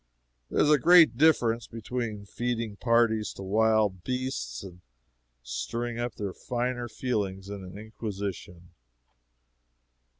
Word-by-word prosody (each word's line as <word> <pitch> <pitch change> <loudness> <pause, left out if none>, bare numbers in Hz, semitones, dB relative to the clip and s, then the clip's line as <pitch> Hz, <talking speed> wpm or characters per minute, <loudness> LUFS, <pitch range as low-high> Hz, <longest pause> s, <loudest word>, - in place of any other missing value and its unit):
There - - -1
is 150 - +5
a 150 - +5
great 170 -4 +7
difference 120 -5 +3
between 115 -2 -4
feeding 115 -1 -3
parties 115 -2 +2
to 95 - -8
wild 105 -2 +2
beasts 130 -2 -3
and 90 -2 -11 0.6
stirring 90 - -4
up 120 -1 -3
their 100 -3 -4
finer 120 0 -3
feelings 100 -6 -3
in 100 -1 -6
an 90 +2 -9
Inquisition. 100 -5 -6
110 Hz, 120 wpm, -28 LUFS, 100-120 Hz, 0.6 s, great